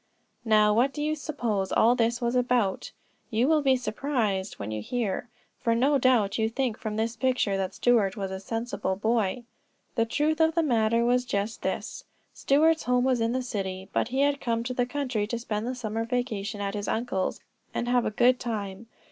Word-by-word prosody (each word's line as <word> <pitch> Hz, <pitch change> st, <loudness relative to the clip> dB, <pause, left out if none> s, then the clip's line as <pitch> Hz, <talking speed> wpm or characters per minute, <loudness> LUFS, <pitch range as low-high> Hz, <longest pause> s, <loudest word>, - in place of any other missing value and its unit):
Now, 215 Hz, -1 st, +4 dB
what 250 Hz, +5 st, +2 dB
do 295 Hz, -, -3 dB
you 305 Hz, +1 st, +1 dB
suppose 235 Hz, -11 st, -2 dB
all 235 Hz, +2 st, +5 dB
this 235 Hz, 0 st, +1 dB
was 240 Hz, -1 st, -1 dB
about? 245 Hz, -6 st, +1 dB, 0.4 s
You 235 Hz, +2 st, +2 dB
will 310 Hz, 0 st, +4 dB
be 270 Hz, -2 st, +4 dB
surprised 220 Hz, -5 st, -1 dB
when 100 Hz, +1 st, -5 dB
you 110 Hz, 0 st, -3 dB
hear, 230 Hz, -, -2 dB, 0.3 s
for 230 Hz, -1 st, +1 dB
no 275 Hz, +4 st, +3 dB
doubt 235 Hz, -6 st, +3 dB
you 220 Hz, 0 st, +2 dB
think 245 Hz, -1 st, -1 dB
from 215 Hz, -3 st, -4 dB
his 225 Hz, +1 st, -1 dB
picture 250 Hz, -5 st, +1 dB
that 190 Hz, -1 st, -2 dB
Stuart 220 Hz, -6 st, +2 dB
was 195 Hz, -2 st, -3 dB
a 190 Hz, -, -4 dB
sensible 225 Hz, -2 st, -3 dB
boy. 220 Hz, +2 st, 0 dB, 0.5 s
The 230 Hz, -2 st, +1 dB
truth 300 Hz, +6 st, 0 dB
of 320 Hz, 0 st, +3 dB
the 335 Hz, -, +3 dB
matter 230 Hz, -4 st, +2 dB
was 250 Hz, +1 st, +3 dB
just 215 Hz, -2 st, -3 dB
this: -, -, -3 dB, 0.3 s
Stuart's 315 Hz, +3 st, +2 dB
home 250 Hz, 0 st, +2 dB
was 255 Hz, -2 st, +2 dB
in 230 Hz, +1 st, +1 dB
the 255 Hz, 0 st, -1 dB
city, 190 Hz, -5 st, -4 dB
but -, -, +1 dB
he 260 Hz, +3 st, -1 dB
had 285 Hz, 0 st, +2 dB
come 230 Hz, -1 st, -1 dB
to 255 Hz, +1 st, -3 dB
the 245 Hz, 0 st, 0 dB
country 250 Hz, -6 st, -2 dB
to 235 Hz, -, -2 dB
spend 220 Hz, -1 st, -3 dB
the 255 Hz, -, -2 dB
summer 225 Hz, -2 st, -3 dB
vacation 230 Hz, -4 st, -3 dB
at 200 Hz, -1 st, -2 dB
his 205 Hz, -1 st, -4 dB
uncle's, 220 Hz, -5 st, -1 dB, 0.3 s
and 240 Hz, -, -3 dB
have 245 Hz, 0 st, +3 dB
a -, -, +1 dB
good 245 Hz, +4 st, +3 dB
time. 210 Hz, -2 st, -4 dB
235 Hz, 200 wpm, -27 LUFS, 210-255 Hz, 0.5 s, all